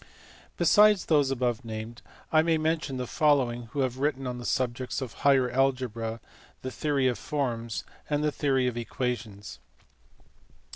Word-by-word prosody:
Besides 210 -2 +5
those 145 -4 +3
above 125 -2 -1
named, 110 +1 -7 0.3
I 155 - +6
may 165 0 +2
mention 155 -4 -1
the 125 - -3
following 125 -4 +2
who 140 +5 -3
have 130 -1 -1
written 135 -1 0
on 125 -1 -4
the 120 - -5
subjects 125 0 -1
of 130 -5 -5
Higher 135 -3 +3
Algebra, 125 -4 0 0.4
the 130 - -4
Theory 140 -1 0
of 120 -5 -1
Forms, 120 -6 -3 0.3
and 150 0 0
the 150 - +2
Theory 135 -3 +1
of 125 -2 -1
Equations. 115 - -4
130 Hz, 150 wpm, -28 LUFS, 120-145 Hz, 0.4 s, I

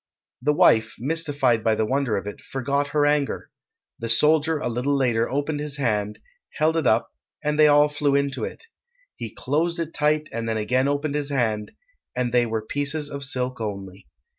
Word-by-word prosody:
The 150 +4 +2
wife, 110 -6 +4
mystified 140 -4 0
by 110 -1 +3
the 110 - 0
wonder 130 -3 0
of 100 - -4
it, 105 - -7
forgot 140 +2 -1
her 145 0 +1
anger. 145 -1 0 0.5
The 115 - -4
soldier 155 +6 +4
a 145 - -3
little 125 +4 0
later 120 -4 +1
opened 145 +2 -1
his 150 -1 -4
hand, 105 -6 -1 0.4
held 160 +1 +2
it 160 -6 +1
up, 110 +2 +2 0.3
and 150 0 0
they 155 - +8
all 145 0 +6
flew 145 -1 0
into 140 -4 0
it. - - -6 0.5
He - - -6
closed 165 +6 -1
it 165 -1 -4
tight 150 +1 +1
and 115 0 -3
then 110 - 0
again 125 +5 +1
opened 145 +1 -1
his 145 -1 -2
hand, 110 -6 -1 0.4
and 125 -1 -1
they 120 -1 +3
were 110 -1 -2
pieces 145 +4 -2
of 140 0 -4
silk 125 -2 -2
only. 100 -4 -6
140 Hz, 190 wpm, -24 LUFS, 115-150 Hz, 0.5 s, they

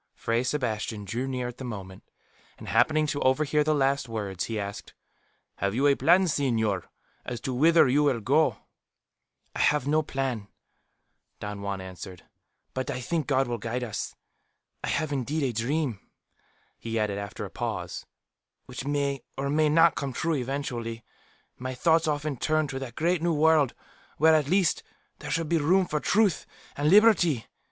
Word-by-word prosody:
'" - - -54
Fray 115 +1 0
Sebastian 110 -6 -2
drew 120 +7 -3
near 125 -2 -2
at 125 - -9
the - - -6
moment, 95 -6 -7 0.6
and - - -11
happening 155 0 +3
to 145 -1 -2
overhear 150 +3 +2
the 155 +1 +2
last 135 -2 +1
words, 100 -5 -3
he 110 -2 -3
asked, 100 0 -6 0.6
"Have 100 +2 -1
you 135 +3 +2
any 145 - +6
plan, 185 +6 +4
señor, 115 - 0 0.4
as 120 -2 -5
to 130 - -3
whither 160 +4 +5
you 140 +4 +3
will 140 -5 +2
go?" 140 +9 +2 1.0
"I - - -4
have 150 -3 +3
no 155 +2 +3
plan," 135 -8 -3 0.9
Don 105 -1 -6
Juan 100 -1 -3
answered. 95 0 -9 0.5
"But 130 +2 -3
I 130 -2 -2
think 155 +3 -2
God 135 -2 +2
will 120 -1 -3
guide 120 +3 -3
us. 115 -4 -4 0.7
I - - -2
have 155 -2 -1
indeed 140 +3 -1
a 130 -3 0
dream," 120 0 -1 0.8
he 115 0 -3
added, 105 -2 0
after 100 -2 -6
a - - -9
pause, - - -4 0.6
"which 125 +1 -7
may, 140 -2 0 0.2
or 140 +1 -1
may 155 +1 +3
not, 165 +1 +5
come 140 -2 -4
true 165 +6 -1
eventually. 125 -4 -3 0.6
My 130 +1 -4
thoughts 160 +4 +3
often 150 -2 -1
turn 155 +4 +1
to 135 - -4
that 125 -3 -7
great 170 +1 +1
New 170 0 +1
World, 155 -3 +3 0.4
where, 160 +2 +5
at 150 -3 +2
least, 185 -1 +2 0.4
there - - -7
should 165 -1 -1
be 165 +1 +2
room 180 +6 +3
for 150 -3 -2
truth 205 +1 +2 0.3
and 145 +1 +1
liberty. 185 - +5
135 Hz, 175 wpm, -27 LUFS, 115-155 Hz, 1.0 s, any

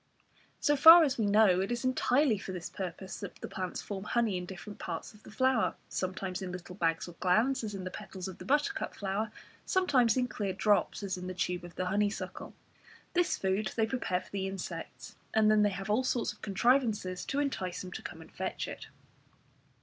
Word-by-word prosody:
So 295 - +3
far 325 +4 +10
as 270 -5 0
we 215 - +2
know, 200 -3 +5
it 195 - -2
is 240 +1 -2
entirely 255 -2 +3
for 195 - -6
this 175 -2 -6
purpose 185 0 -6
that 200 - -7
the - - -7
plants 185 -1 -4
form 200 -1 -5
honey 230 -3 +1
in 180 0 -4
different 195 +3 -9
parts 165 +3 -5
of 210 - -18
the - - -14
flower, 260 0 +2
sometimes 185 0 -3
in 185 -1 -4
little 180 0 -7
bags 165 -3 0
or - - -8
glands, 225 +9 +2
as 210 -2 -4
in 190 - -5
the 185 - -5
petals 195 -3 -7
of 190 - -8
the - - -8
buttercup 300 +9 0
flower, 205 +2 -2 0.3
sometimes 265 - +3
in 250 -1 +2
clear 200 -5 -3
drops, 205 +2 +1
as 190 -2 -2
in 180 - -6
the 185 - -5
tube 180 0 -1
of 175 -1 -10
the 185 - -2
honeysuckle. 200 +2 -2 0.6
This 355 -1 +2
food 190 +3 -1
they 225 - +3
prepare 220 -6 -1
for - - -17
the 195 -1 -2
insects, 165 -9 -7 0.2
and 215 -1 +5
then 215 0 +5
they 205 - +4
have 195 0 -5
all 235 +5 +3
sorts 250 -4 0
of 210 - -23
contrivances 210 -4 +1
to 275 - -3
entice 190 -11 -2
them 185 - -8
to - - -6
come 165 - -8
and 160 - -14
fetch 190 0 -3
it. - - -8
200 Hz, 210 wpm, -31 LUFS, 185-235 Hz, 0.6 s, far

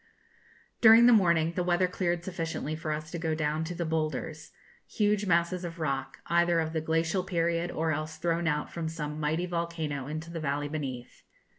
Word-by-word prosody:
During 225 +1 +9
the 245 - +8
morning, 170 -5 +3
the 180 - -1
weather 180 +1 +2
cleared 175 -1 -1
sufficiently 165 -4 -3
for 155 0 -4
us 155 +1 -4
to 170 - -4
go 160 -1 -1
down 155 0 -1
to 175 +2 -5
'The 170 - -2
Boulders,' 155 -1 -3 0.4
huge 210 -1 +1
masses 170 +1 +1
of 170 0 -6
rock, 135 -3 -2
either 170 0 +3
of 160 0 -2
the 160 - 0
glacial 165 +3 0
period, 170 -2 0
or 160 -1 -1
else 155 +1 -3
thrown 170 0 0
out 150 -1 -1
from 165 -2 -3
some 150 -2 -5
mighty 155 +3 0
volcano 170 -5 -3
into 155 +2 -5
the 170 - -4
valley 145 -1 -2
beneath. 135 -5 -5
165 Hz, 185 wpm, -29 LUFS, 155-175 Hz, 0.4 s, During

